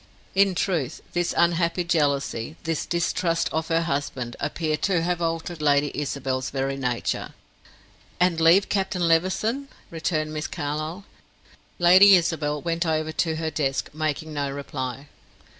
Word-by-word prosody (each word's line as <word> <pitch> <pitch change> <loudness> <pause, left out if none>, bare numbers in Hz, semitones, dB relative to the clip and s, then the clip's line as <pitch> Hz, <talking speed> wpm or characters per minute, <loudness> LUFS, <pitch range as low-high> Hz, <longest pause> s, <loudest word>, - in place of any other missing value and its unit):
In 195 -1 +3
truth 170 -9 -1
this 175 -1 0
unhappy 170 +1 +2
jealousy, 145 -5 0
this 165 -2 -2
distrust 170 -1 0
of 160 0 -1
her 165 0 +2
husband, 140 -6 -3
appeared 155 +1 -2
to 180 -4 +1
have 175 0 -1
altered 165 0 -2
Lady 145 -1 +3
Isabel's 135 -3 -2
very 135 0 -2
nature. 125 -3 -2 0.8
"And 175 -2 +2
leave 170 +5 +5
Captain 190 -3 0
Levison?" 190 +11 +1 0.2
returned 155 -2 -2
Miss 155 -1 -3
Carlyle. 155 +6 -4 0.7
Lady 185 +3 +8
Isabel 155 -4 0
went 170 0 0
over 155 -1 -1
to 160 0 0
her 160 0 -2
desk, 135 -4 -1
making 155 0 -3
no 145 -1 -1
reply. 135 -1 -5
160 Hz, 135 wpm, -24 LUFS, 145-175 Hz, 0.8 s, Lady